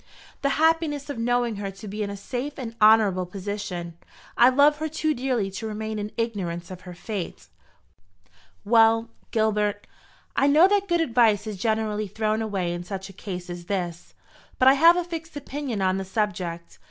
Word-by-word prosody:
"The 280 - +1
happiness 315 -3 +1
of 240 - -6
knowing 240 -1 0
her 200 -1 -4
to 195 +2 -10
be 210 +2 -5
in 205 - -2
a 200 - -6
safe 250 +8 -5
and 235 -4 -6
honourable 210 -4 +5
position. 180 -3 -5 0.4
I 240 - +7
love 285 +3 +4
her 315 +1 -2
too 310 0 0
dearly 245 -7 -1
to 200 +3 -5
remain 215 0 -4
in 210 +1 -4
ignorance 185 -7 -3
of 185 -1 -8
her 175 - -9
fate." 170 - -6 1.2
"Well, 225 +1 +4 0.2
Gilbert, 210 -2 0 0.5
I 275 - +3
know 305 +6 +6
that 400 0 +1
good 345 -2 +2
advice 230 -7 +3
is 215 -2 -5
generally 215 0 -1
thrown 215 +2 -1
away 195 -5 -2
in 175 0 -5
such 190 +1 -6
a - - -12
case 180 -2 -7
as 175 -1 -7
this; 175 -3 -4 0.4
but 255 - +4
I 265 - +9
have 330 +5 +6
a 355 - +1
fixed 330 -2 -7
opinion 275 -7 -4
on 185 0 +2
the 195 - -4
subject. 180 -4 -3
215 Hz, 180 wpm, -25 LUFS, 195-260 Hz, 1.2 s, I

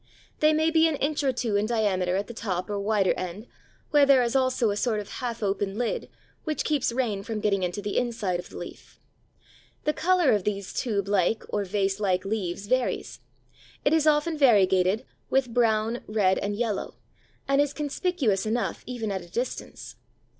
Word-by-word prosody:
They 305 0 +5
may 315 +1 +2
be 325 0 +5
an 320 - 0
inch 290 +2 -1
or 270 - +3
two 235 -4 -2
in 205 +1 +1
diameter 195 -6 +1
at 200 +2 -1
the 235 - -9
top 185 -4 -3
or 205 - -1
wider 200 -2 +2
end, 185 +4 -6 0.5
where 295 -2 +6
there 275 -2 +6
is 235 +2 -1
also 255 -4 +2
a - - -2
sort 220 0 0
of 205 - -6
half 235 -3 -3
open 195 0 -1
lid 245 -1 -2 0.3
which 310 -2 -2
keeps 295 -6 +1
rain 230 -5 -1
from 215 +2 -4
getting 205 -2 +1
into 180 +3 -2
the 205 - 0
inside 225 -7 -1
of 180 - -8
the - - -10
leaf. - - -10 0.8
The 300 - +1
colour 355 -4 +3
of 205 -3 +2
these 200 -1 -3
tube 200 -5 -1
like 200 +2 +1
or 205 -1 -1
vase 195 0 0
like 185 -3 0
leaves 195 -2 -3
varies. 255 +3 -1 0.7
It 285 - +4
is 315 -1 +3
often 305 +1 +2
variegated 200 -3 +4 0.2
with 260 -3 +1
brown, 225 0 +1
red, 205 -3 +2
and 205 0 -2
yellow, 220 -2 -2 0.5
and 275 +1 +4
is 290 -1 +1
conspicuous 290 - -1
enough 230 +2 -1
even 235 -4 -3
at 190 -1 -2
a 175 - -13
distance. 240 +8 -5
220 Hz, 190 wpm, -26 LUFS, 200-260 Hz, 0.8 s, where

